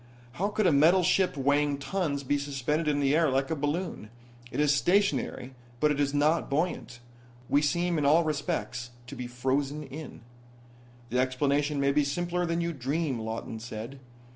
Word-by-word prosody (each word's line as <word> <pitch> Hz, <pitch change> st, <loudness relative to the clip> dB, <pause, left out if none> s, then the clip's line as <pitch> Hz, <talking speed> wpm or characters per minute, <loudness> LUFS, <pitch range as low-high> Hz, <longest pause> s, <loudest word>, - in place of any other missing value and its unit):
"How 185 Hz, +11 st, -1 dB
could 210 Hz, 0 st, 0 dB
a 180 Hz, -, +5 dB
metal 165 Hz, +6 st, +5 dB
ship 180 Hz, -3 st, +2 dB
weighing 145 Hz, +1 st, +2 dB
tons 145 Hz, -2 st, -2 dB
be 145 Hz, +2 st, 0 dB
suspended 145 Hz, +3 st, -2 dB
in 145 Hz, -1 st, +2 dB
the 140 Hz, +1 st, +3 dB
air 160 Hz, -2 st, +3 dB
like 135 Hz, +2 st, 0 dB
a -, -, +1 dB
balloon? 150 Hz, -, -3 dB, 0.4 s
It -, -, -4 dB
is 150 Hz, -1 st, +4 dB
stationary, 145 Hz, -7 st, +1 dB, 0.3 s
but 150 Hz, +2 st, +3 dB
it 145 Hz, -, -1 dB
is 140 Hz, -1 st, +2 dB
not 150 Hz, +3 st, +2 dB
buoyant. 140 Hz, -4 st, -2 dB, 0.5 s
We 145 Hz, -, +3 dB
seem 170 Hz, +2 st, +1 dB
in 145 Hz, -, 0 dB
all 160 Hz, +4 st, +5 dB
respects 145 Hz, -5 st, -3 dB, 0.2 s
to 140 Hz, -, -9 dB
be 125 Hz, -1 st, -5 dB
frozen 135 Hz, +4 st, -1 dB
in." 145 Hz, 0 st, -9 dB, 0.9 s
"The 125 Hz, -, +1 dB
explanation 140 Hz, +3 st, +1 dB
may 140 Hz, 0 st, +3 dB
be 150 Hz, +1 st, +3 dB
simpler 175 Hz, +5 st, -1 dB
than 170 Hz, +1 st, 0 dB
you 170 Hz, 0 st, -1 dB
dream," 140 Hz, 0 st, -2 dB
Lawton 110 Hz, 0 st, -5 dB
said. 115 Hz, +3 st, -7 dB
145 Hz, 175 wpm, -28 LUFS, 135-165 Hz, 0.9 s, a